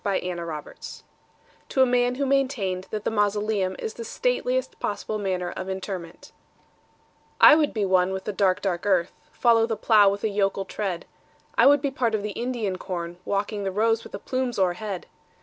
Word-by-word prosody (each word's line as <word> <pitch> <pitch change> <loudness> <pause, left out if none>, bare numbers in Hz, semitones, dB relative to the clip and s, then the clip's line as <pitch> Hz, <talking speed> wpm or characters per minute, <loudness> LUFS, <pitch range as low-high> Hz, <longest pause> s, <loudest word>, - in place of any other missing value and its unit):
The 200 -2 +1
Traveller 175 -2 -4
heart 150 -1 -8 0.7
(To 265 - +4
a - - +5
Man 245 0 +2
who 280 +2 -1
maintained 255 -10 0
that 215 -1 -4
the - - -1
Mausoleum 205 -2 0
is 220 - -5
the 230 - -7
Stateliest - - -1
Possible 210 +1 -3
Manner 185 -3 -2
of 185 - -6
Interment) 190 -3 -6 1.1
I - - +10
would 300 -1 +3
be 210 -3 -1
one 185 -1 +3
with 190 0 -4
the 210 - -4
dark, 190 0 +2
dark 185 -1 -2
earth:— 185 -3 +2 0.2
Follow 230 -2 +3
the 225 -2 -2
plough 210 -2 +5
with 200 +1 -3
a 220 - +1
yokel 195 -1 0
tread. 190 -3 -4 0.5
I - - +6
would 285 0 +6
be 280 - 0
part 240 -5 0
of 205 - -2
the 210 - -3
Indian 225 -5 -3
corn, 175 -2 -5
Walking 205 +1 -2
the 195 - -1
rows 225 +3 +1
with - - -13
the - - -3
plumes 255 -2 -2
o'erhead. 190 +1 -1
205 Hz, 190 wpm, -25 LUFS, 190-230 Hz, 1.1 s, I